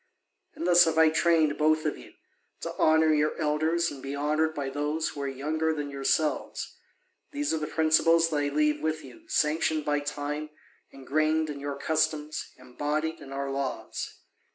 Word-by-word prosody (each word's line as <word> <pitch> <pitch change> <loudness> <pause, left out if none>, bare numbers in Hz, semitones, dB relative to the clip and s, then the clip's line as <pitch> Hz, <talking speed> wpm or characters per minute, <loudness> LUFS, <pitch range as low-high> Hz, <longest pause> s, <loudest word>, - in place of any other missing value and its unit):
And 170 - -4
thus 175 -1 +7
have 160 -1 0
I 160 0 +6
trained 160 -2 +2
both 155 +1 +3
of 150 - 0
you, - - -14 0.5
to - - -4
honour 160 0 +4
your 150 0 +1
elders 160 +2 +1
and 135 - -9
be 135 +1 -5
honoured 155 +2 0
by 140 -2 -3
those 150 +3 -1
who 145 - -7
are 140 - -2
younger 155 +4 -1
than 145 -1 -4
yourselves. 150 - -1 0.6
These 290 - -1
are 160 - 0
the 150 - -3
principles 165 +1 +3
that 150 - 0
I 145 0 +1
leave 150 0 +1
with 155 0 -2
you, 335 -1 -14
sanctioned 155 - +1
by 145 0 +1
time, 145 +1 -4 0.4
ingrained 155 +3 0
in 140 -1 -8
our 145 -1 -3
customs, 155 0 -1
embodied 150 +5 -3
in 135 - -11
our 140 0 -3
laws. 135 -1 -4
155 Hz, 175 wpm, -28 LUFS, 145-160 Hz, 0.6 s, thus